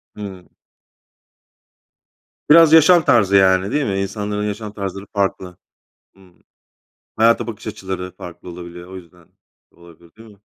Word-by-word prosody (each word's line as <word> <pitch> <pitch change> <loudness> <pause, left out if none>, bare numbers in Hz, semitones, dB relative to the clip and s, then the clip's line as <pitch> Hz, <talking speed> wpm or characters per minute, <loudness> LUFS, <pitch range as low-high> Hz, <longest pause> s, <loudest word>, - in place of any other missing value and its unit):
Hımm. 95 -4 -10 2.0
Biraz 160 0 +7
yaşam 160 +1 +6
tarzı 100 -4 +3
yani, 95 +1 +3
değil 145 -2 0
mi? 95 -1 -2
İnsanların 105 +1 -4
yaşam 105 0 -6
tarzları 100 -1 -6
farklı. 95 -3 -3 0.6
Hı. 95 - -25 1.0
Hayata 115 +2 +2
bakış 115 -1 -8
açıları 95 -3 -6
farklı 90 0 -11
olabiliyor. 85 0 -10
O - - -9
yüzden 90 -2 -15 0.4
olabilir, 85 -1 -19
değil 115 0 -15
mi? 100 -2 -20
100 Hz, 125 wpm, -19 LUFS, 90-110 Hz, 2.0 s, Biraz